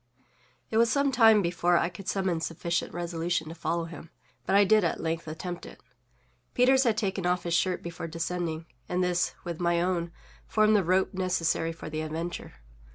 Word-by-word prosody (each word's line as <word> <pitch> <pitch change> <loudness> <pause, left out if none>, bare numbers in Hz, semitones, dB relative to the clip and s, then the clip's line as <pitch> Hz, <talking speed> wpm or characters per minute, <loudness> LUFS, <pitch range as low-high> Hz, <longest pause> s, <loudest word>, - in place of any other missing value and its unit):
It 220 - +1
was 230 0 +4
some 280 -1 +2
time 225 -4 +6
before 175 0 +2
I - - +2
could 180 +2 -11
summon 190 -4 0
sufficient 170 +1 -2
resolution 170 -1 -2
to - - -6
follow 170 0 -2
him; 165 -1 -10 0.4
but - - +2
I 200 - +7
did 215 +1 +4
at 170 - 0
length 165 0 -3
attempt 175 +3 -5
it. - - -13 0.8
Peters 260 +2 +4
had 225 -3 +2
taken 190 -3 -1
off 180 0 +1
his 170 - -2
shirt 180 +2 +1
before 170 -1 -6
descending, 165 0 -3 0.2
and 180 +1 +1
this, 180 -1 0
with 170 -2 -5
my 170 -1 +2
own, 175 -1 -1 0.4
formed 215 0 +3
the 200 - +4
rope 185 +3 +1
necessary 175 -3 0
for 165 - -9
the 155 0 -3
adventure. 165 +3 -5
175 Hz, 185 wpm, -28 LUFS, 165-190 Hz, 0.8 s, I